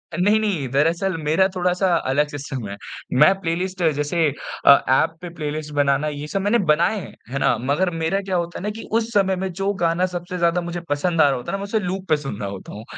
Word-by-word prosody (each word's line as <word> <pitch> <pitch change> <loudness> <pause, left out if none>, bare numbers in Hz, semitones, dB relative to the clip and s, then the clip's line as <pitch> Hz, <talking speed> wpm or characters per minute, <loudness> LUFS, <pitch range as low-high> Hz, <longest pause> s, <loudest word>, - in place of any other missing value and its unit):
नहीं, 205 +5 +3
नहीं। 190 -11 -1
दरअसल 165 +7 +1
मेरा 165 +6 +3
थोड़ा-सा 180 +1 +1 0.2
अलग 145 +3 +2
सिस्टम 135 -6 -6
है। 100 - -5 0.5
मैं 155 +6 +8
प्लेलिस्ट 185 +1 -2
जैसे 145 +3 -2 0.5
अ, - - +7 0.2
ऐप 135 +5 +3
पे 175 - -6
प्लेलिस्ट 150 -1 -4
बनाना 145 +1 +2
ये 150 0 -5
सब 195 +5 -2
मैंने 205 +4 +2
बनाए 170 +8 +3
हैं। 170 - -9 0.2
है 140 - -2
ना? 120 - +3
मगर 145 +8 +1
मेरा 165 +3 -1
क्या 190 -2 -3
होता 170 0 -2
है - - -8
ना, 210 - -1
कि 220 +2 -7
उस 225 +1 0
समय 190 -2 +3
में 190 +1 -3
जो 195 +3 -1
गाना 170 +2 +2
सबसे 180 0 -5
ज़्यादा 170 +1 +2
मुझे 175 0 -4
पसंद 160 +3 +1
आ 145 - +6
रहा 135 - +1
होता 120 - -6
है 195 - -1
ना, - - -8
मै - - -4
उसे 220 +1 0
लूप 190 0 -4
पे 155 - +4
सुन 135 -8 -6
रहा 100 -1 -3
होता 100 -1 -8
हूँ। 105 - -8
170 Hz, 240 wpm, -22 LUFS, 145-190 Hz, 0.5 s, मैं